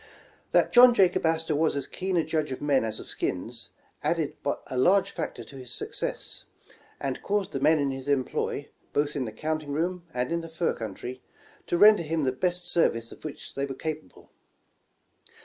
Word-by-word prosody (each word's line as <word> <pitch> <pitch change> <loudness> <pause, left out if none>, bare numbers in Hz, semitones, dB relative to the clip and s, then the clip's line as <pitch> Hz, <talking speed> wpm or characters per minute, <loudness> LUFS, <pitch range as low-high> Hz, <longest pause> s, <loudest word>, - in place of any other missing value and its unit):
That - - +3
John 245 0 +9
Jacob 185 -4 +4
Astor 160 -1 +1
was 155 +1 +2
as 140 - -1
keen 185 -1 -2
a 165 - +3
judge 155 -3 -1
of 130 - -4
men 140 -4 +2
as 110 -1 -3
of - - -8
skins, - - -3 0.3
added - - 0 0.3
a - - -5
large 180 +10 +4
factor 120 - -4
to 135 - -13
his 125 -2 -7
success, - - -4 0.5
and 135 -2 -3
caused 200 -2 -1
the 135 - -2
men 155 +3 +5
in 140 -2 +1
his 135 0 -6
employ, 140 -3 -1 0.2
both 145 +1 +1
in 135 -3 -1
the 110 - -5
counting 155 +4 -3
room 175 +3 -1
and 125 +2 -2
in 170 0 0
the 165 - -8
fur 165 +1 0
country, 120 +4 -6 0.5
to 175 - +1
render 210 0 +8
him 160 -1 -1
the 130 - +2
best 180 +6 -1
service 115 -10 +2
of - - -13
which 155 -2 -7
they 140 0 -2
were 135 - -5
capable. 155 +2 -6
155 Hz, 190 wpm, -27 LUFS, 135-170 Hz, 0.5 s, John